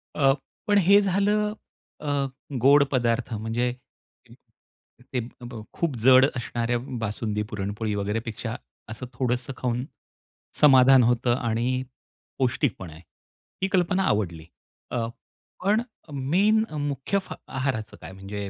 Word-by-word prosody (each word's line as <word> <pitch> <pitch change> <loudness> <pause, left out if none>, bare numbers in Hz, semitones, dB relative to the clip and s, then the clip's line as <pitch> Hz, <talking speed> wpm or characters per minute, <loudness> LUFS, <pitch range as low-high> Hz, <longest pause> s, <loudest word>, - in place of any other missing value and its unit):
अ, 135 -2 +4 0.3
पण 205 0 +4
हे 200 +2 +6
झालं, 205 +2 +1 0.5
अ, 150 - -3 0.6
गोड 140 +1 +7
पदार्थ 120 -2 0
म्हणजे 115 +3 -1 1.4
ते 125 - +1
अ, 120 +1 -9
ब् 120 -3 -7
खूप 165 -6 -1
जड 130 0 +8
असणाऱ्या 120 0 -1 0.3
बासुंदी, 105 0 -2
पुरणपोळी 105 +1 -3
वगैरे 105 +2 -1
पेक्षा 115 +1 -4 0.3
असं 115 +3 -6
थोडंसं 125 +1 -1
खाऊन 125 0 -1 0.8
समाधान 130 -2 +7
होतं 120 +1 +2
आणि 115 +2 0 0.7
पौष्टिकपण 125 - 0
आहे. 80 - -13 0.6
ही 190 - +2
कल्पना 185 +1 +2
आवडली. 85 -6 -3 0.5
अ, 115 -2 -1 0.6
पण 210 +4 +3 0.5
मेन 215 +4 +4 0.2
मुख्य 140 +8 -1 0.3
आहाराचं 130 -5 -3
काय? - - -8
म्हणजे 100 +1 -6
125 Hz, 115 wpm, -25 LUFS, 110-145 Hz, 1.4 s, जड